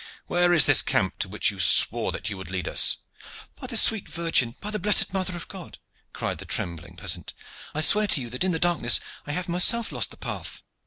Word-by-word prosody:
"Where 175 0 +1
is 160 -8 +6
this - - +6
camp 95 - -1
to 95 - -3
which 105 +1 0
you 100 - -12
swore 80 -3 +4
that - - -6
you 105 - -3
would 95 -3 -10
lead 95 -1 -4
us?" - - +2 0.6
"By - - -9
the 240 -3 -1
sweet 220 -1 +3
Virgin! 165 -9 -1
By 210 - -5
the 210 - -3
blessed 205 0 +3
Mother 185 -2 -2
of 170 - -9
God!" 185 -3 -11 0.3
cried - - -5
the - - -8
trembling 85 +1 -4
peasant, - - -4 0.4
"I 155 - 0
swear 210 +6 +4
to 160 - +1
you 120 -3 -7
that 125 - -2
in 190 - 0
the 165 - -1
darkness 165 -8 +2 0.3
I 145 - -3
have 180 +3 -3
myself 200 +7 +3
lost - - -1
the - - -13
path." - - -7
170 Hz, 225 wpm, -24 LUFS, -, 0.6 s, is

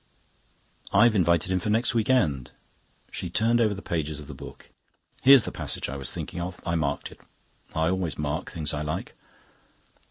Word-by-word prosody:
"I've 115 +3 +5
invited 85 -2 +2
him 95 - +2
for 105 - -3
next 115 +4 +3
week 115 -1 0
end." 75 - +2 0.6
She 90 - -4
turned 115 +6 +2
over 105 -3 +2
the 95 - -9
pages 80 -3 -2
of 75 - -9
the 75 - -9
book. 65 - -12 0.5
"Here's 135 -3 +8
the - - -4
passage - - -3
I 70 - -5
was 65 -2 0
thinking 85 - -5
of. 90 +1 -5
I 85 - -1
marked 75 -3 -1
it. - - -16 0.5
I 80 +1 +2
always 90 -3 -1
mark 75 +3 -2
the - - -10
things 80 -4 0
I 75 - -2
like." 75 +1 -4
85 Hz, 190 wpm, -26 LUFS, 75-105 Hz, 0.6 s, Here's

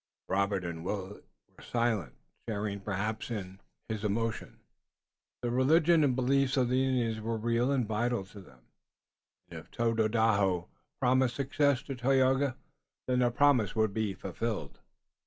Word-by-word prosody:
Robert 100 -1 0
and 80 -1 -5
Willet 100 +1 -5 0.3
were - - -16
silent, 115 - -1 0.3
sharing 105 -1 -2
perhaps 105 +3 -3
in 95 -4 -6 0.3
his 110 -2 -4
emotion. 110 +2 -2 0.8
The 120 - 0
religion 155 +6 +4
and 130 -4 +2
beliefs 135 +1 +2
of 125 -2 +2
the 130 +1 +2
Indian 120 -4 0
were 115 0 -1
real 120 +3 +1
and 130 -5 +1
vital 115 -1 -1
to 100 +1 -12
them, 65 -9 -18 0.9
and - - -6
if - - -16
Tododaho 110 -5 +1 0.3
promised 130 -1 +2
success 140 -1 +1
to 140 - -5
Tayoga 130 +1 +2 0.5
then 125 -1 +1
the 125 -1 +3
promise 120 -5 +3
would 110 -2 +1
be 110 -3 -1
fulfilled. 105 -8 -4
115 Hz, 140 wpm, -30 LUFS, 100-130 Hz, 0.9 s, religion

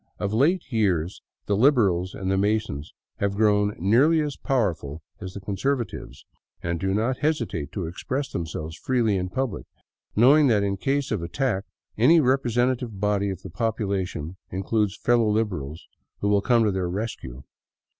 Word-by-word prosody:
Of 100 0 -2
late 160 +10 +3
years 95 -7 0 0.2
the 100 - +1
Liberals 100 -8 +3
and 95 0 -2
the - - +2
Masons 100 -7 -1 0.3
have 100 -1 -1
grown 105 -1 +2
nearly 125 - +4
as 150 -2 -3
powerful 85 - -1 0.2
as 95 0 -8
the - - -4
Conservatives, 100 - -3 0.4
and 85 -1 -2
do 95 +2 0
not 120 +5 0
hesitate 115 - -1
to 95 -5 -3
express 130 - -3
themselves 80 -1 -4
freely 120 -4 +1
in 90 -1 -2
public, 130 -1 -3 0.5
knowing 140 +6 +6
that 105 -5 +3
in 100 -1 -1
case 135 +5 -1
of 105 -6 -1
attack 100 +3 -1 0.3
any 155 +9 +6
representative 125 -4 +1
body 100 0 +1
of 95 -1 -6
the 95 - -8
population 95 -5 -2
includes 100 +2 -1
fellow 120 -2 +2
Liberals 90 -9 -2 0.4
who 100 - +1
will 100 -1 +3
come 120 +1 +3
to 105 - +2
their 95 -2 -1
rescue. 90 - -5
105 Hz, 155 wpm, -25 LUFS, 95-120 Hz, 0.5 s, knowing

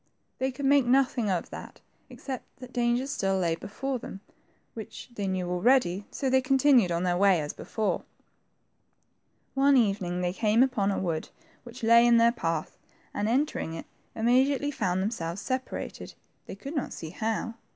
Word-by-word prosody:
They 265 +1 0
could 270 +2 -5
make 275 -2 +4
nothing 250 -4 +2
of 180 -3 -2
that - - -9 0.3
except 265 -3 -7
that 255 0 -11
dangers 245 +2 0
still 195 -1 0
lay 170 -3 +1
before 255 +9 -4
them, 195 - -9 0.5
which 220 +2 -9
they 205 -4 -3
knew 185 -1 -2
already, 195 +1 +2
so 275 - -3
they 260 0 +3
continued 260 -6 +4
on 170 +1 0
their 175 -1 +1
way 195 -3 +5
as 150 -1 -4
before. 215 -2 -2 1.5
One 275 0 +4
evening 195 -6 +1
they 180 0 -1
came 220 +4 +3
upon 230 -7 +1
a 200 - 0
wOod 165 -4 -2 0.3
which 240 0 -12
lay 230 +1 +6
in 235 -1 +6
their 230 0 +5
path, 165 -9 -3 0.3
and, 210 +1 -1
entering 255 - 0
it, 165 - -7 0.3
immediately 260 +5 +2
found 185 -8 -1
them 210 - -1
selves 170 -4 -4
separated, 260 +5 -5 0.3
they - - -7
could 275 +10 -8
not 285 - -2
see 160 -1 -7
how. 225 +3 -2
225 Hz, 170 wpm, -28 LUFS, 185-260 Hz, 1.5 s, lay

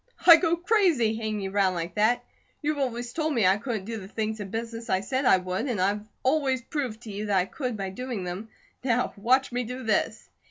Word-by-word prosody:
I'd 335 -2 +10
go 335 -1 +3
crazy 345 - +2
hanging 215 -3 -3
around 190 -2 +2
like 170 0 -4
that. 220 +3 +2 0.4
You've 300 0 0
always 245 -2 -2
told 310 -1 -1
me 225 -5 +3
I 190 +2 +5
couldn't 215 -3 -4
do 225 +1 -4
the 190 - -9
things 220 +1 -3
in 200 -2 -5
business 230 +1 -5
I 190 0 +2
said 260 +6 -1
I 190 - +6
would; 185 +7 -3
and 235 -7 -1
I've 205 +3 0 0.2
always 265 -2 +1
proved 245 -5 -3
to 225 -4 -8
you 205 +2 -4
that 200 -2 +2
I 180 - +3
could, 250 +1 -4
by 195 -1 -3
doing 240 -1 -4
them. 180 +5 -5 0.3
Now 250 -1 +1
watch 255 +6 +2
me 245 +1 -1
do 250 +2 -6
this." 220 -2 0
225 Hz, 225 wpm, -27 LUFS, 200-260 Hz, 0.4 s, I'd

